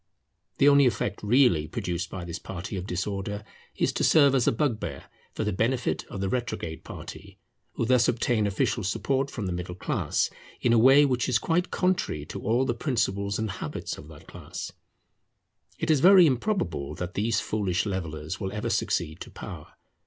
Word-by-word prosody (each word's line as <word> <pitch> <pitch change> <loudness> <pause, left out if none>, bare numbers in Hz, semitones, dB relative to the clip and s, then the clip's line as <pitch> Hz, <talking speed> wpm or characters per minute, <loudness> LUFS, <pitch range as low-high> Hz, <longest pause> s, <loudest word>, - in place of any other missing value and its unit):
The 140 - +5
only 140 -2 +7
effect 105 -3 -2
really 105 - +3
produced 85 +2 -3
by 90 -2 -6
this 85 -1 -5
party 95 +2 -6
of 95 0 -5
disorder, 100 +2 -3 0.3
is - - 0
to - - -1
serve 140 -3 +6
as 130 -3 +2
a - - +6
bugbear 115 -3 -2 0.3
for - - -1
the 105 -2 -1
benefit 120 +6 0
of 100 - -7
the 95 - 0
retrograde 95 -8 -3
party, - - -10 0.4
who - - -1
thus 125 0 +4
obtain 115 -2 +1
official 105 +2 0
support 135 +8 0
from 110 -7 -5
the 90 - -2
middle 90 0 -4
class, - - -1 0.3
in 120 - +2
a 115 - +5
way 135 +5 +7
which 125 -2 0
is 125 - +4
quite 170 +8 0
contrary 180 - 0
to - - -7
all 120 +5 +1
the 120 - 0
principles 100 -6 -1
and 110 -2 -2
habits 85 -5 -5
of 75 - -12
that 80 -2 -13
class. - - -7 1.1
It 165 0 0
is 150 - +4
very 185 +3 +8
improbable 120 - -1
that 90 +1 -5
these 110 +1 +1
foolish 100 -3 -1
levellers 85 -4 -4
will 95 -2 -3
ever 105 0 -3
succeed 80 +2 -1
to - - -8
power. - - -9
105 Hz, 180 wpm, -27 LUFS, 90-130 Hz, 1.1 s, very